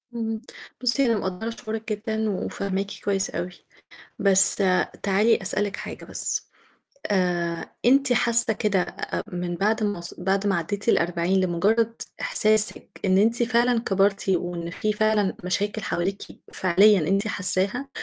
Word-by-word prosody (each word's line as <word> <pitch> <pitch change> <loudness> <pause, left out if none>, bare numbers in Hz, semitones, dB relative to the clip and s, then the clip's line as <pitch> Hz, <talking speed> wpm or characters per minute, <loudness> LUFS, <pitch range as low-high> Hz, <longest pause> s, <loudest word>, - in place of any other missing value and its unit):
امم 225 -1 -3 0.4
بُصي 255 +2 +2
أنا 230 -2 +2
مقدرة 190 +5 -3
شعورِك 220 -1 -6
جدًا، 220 +1 -2
وفاهماكِ 195 0 -3 0.2
كويس 195 -1 0
أوي، 175 +1 -4 0.7
بس 195 -1 +4 0.5
تعالي 205 +3 +3
أسألِك 200 +1 -1
حاجة - - -8
بس، - - -3 0.6
آآ 175 -4 -1
أنتِ 270 +1 +4
حاسة 235 -1 +3
كده 200 -4 -1 0.4
من 175 0 -3
بعد 215 +3 +1
ما 205 -4 -2
ص 170 - -7
بعد 195 +2 0
ما 195 -3 +2
عديتِ 200 +6 -3
ال40 175 0 +2
لمُجرد 210 +6 +1 0.2
إحساسِك 215 +1 +1
إن 190 0 +3
أنتِ 230 +3 +2
فعلًا 240 0 +2
كبرتِ، 195 -2 +1
وإن 175 -2 -1
في 215 +4 -1
فعلًا 210 -2 +1
مشاكل 205 +3 -1
حواليكِ 195 +3 -2 0.3
فعليًا 190 +2 +4
أنتِ 200 +3 +1
حاساها، 200 +7 -1
200 Hz, 135 wpm, -24 LUFS, 185-220 Hz, 0.7 s, بس